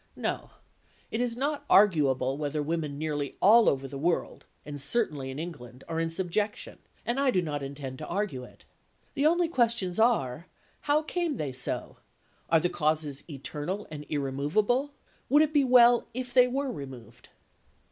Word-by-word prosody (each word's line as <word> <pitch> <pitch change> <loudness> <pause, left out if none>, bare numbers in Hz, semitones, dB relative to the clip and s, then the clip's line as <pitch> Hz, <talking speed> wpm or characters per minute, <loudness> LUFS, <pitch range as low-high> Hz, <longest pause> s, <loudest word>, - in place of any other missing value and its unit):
No, - - -3 0.6
it 225 - -1
is 240 -1 -1
not 285 +2 -1
arguable 140 -10 +4
whether 150 0 -2
women 155 -2 -3
nearly 145 -2 -3
all 225 +3 +6
over 135 -1 -2
the 135 0 -7
world 170 +4 -1 0.2
(and 145 -1 -5
certainly 145 - +1
in 130 - -6
England) 135 -6 -8
are 165 -1 -2
in 165 0 0
subjection, 190 +5 -2 0.3
and 240 +3 -1
I 275 -1 +3
do 215 - +2
not 150 -4 -3
intend 135 -1 -7
to 155 - -6
argue 185 -9 -2
it. - - -16 0.5
The 285 +2 +2
only 345 +1 +3
questions 235 - +1
are, 170 - +1 0.4
How 300 +2 +4
came 340 -1 -2
they 145 - -4
so? 125 0 -3 0.5
Are 165 - +5
the 175 - +1
causes 155 -4 -1
eternal 150 +7 -5
and 150 -1 -8
irremovable? 155 - 0 0.4
Would 295 +3 +6
it 310 0 -1
be 290 -2 +4
well 245 -2 +6
if 250 -1 -5
they 250 0 +6
were 270 +1 -2
removed? 130 - -10
165 Hz, 165 wpm, -28 LUFS, -, 0.6 s, all